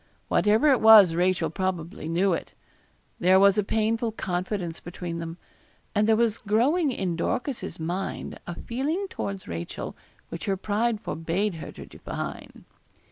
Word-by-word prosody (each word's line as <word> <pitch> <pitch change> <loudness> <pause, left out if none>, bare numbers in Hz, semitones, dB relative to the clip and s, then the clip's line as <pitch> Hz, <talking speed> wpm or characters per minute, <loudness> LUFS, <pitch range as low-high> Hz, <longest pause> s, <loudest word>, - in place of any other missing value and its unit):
Whatever 215 +7 +3
it 265 - +4
was 215 -6 +9
Rachel 175 -2 +1
probably 180 -2 -3
knew 180 +3 +2
it. - - -5 0.6
There 185 +2 +5
was 200 +1 +5
a - - +2
painful 225 +2 0
confidence 180 -3 -3
between 175 -1 -6
them; 165 0 -6 0.6
and 210 0 +2
there 220 - +5
was 225 -1 +1
growing 265 - +2
in 185 -7 -2
Dorcas's 250 - -3
mind 175 +4 -4
a 175 - -4
feeling 295 +11 -2
towards 195 -1 -5
Rachel 85 0 -5 0.3
which 165 - -6
her 195 -1 0
pride 215 +3 0
forbade 180 +3 -1
her 160 - -7
to - - -10
define. - - -7
195 Hz, 145 wpm, -26 LUFS, 175-220 Hz, 0.6 s, was